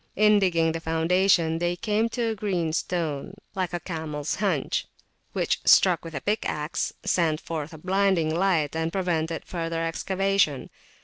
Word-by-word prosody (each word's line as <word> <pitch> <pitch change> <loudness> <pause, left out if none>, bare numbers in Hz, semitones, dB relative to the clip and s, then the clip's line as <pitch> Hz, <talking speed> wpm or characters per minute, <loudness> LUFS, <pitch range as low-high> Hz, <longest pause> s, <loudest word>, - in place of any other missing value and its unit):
In 210 0 +5
digging 170 -4 +2
the 165 - -3
foundation 165 +1 +2
they 175 0 0
came 215 +4 0
to 230 -1 -1
a - - -1
green 185 -6 -1
stone, 165 0 -2 0.2
like 185 -3 -2
a 175 - -2
camels 155 -4 -4
hunch, 185 -9 0 0.5
which, - - 0
struck 180 -4 +5
with 165 -2 -8
a 140 - -3
pickaxe, 170 -7 -1
sent 160 -3 +1
forth 160 -1 -6
blinding 190 -4 +2
lightning, 160 -4 +1
and 160 0 -1
prevented 165 -3 -1
further 165 -1 -3
excavation. 190 -3 0
170 Hz, 145 wpm, -26 LUFS, 160-195 Hz, 0.5 s, In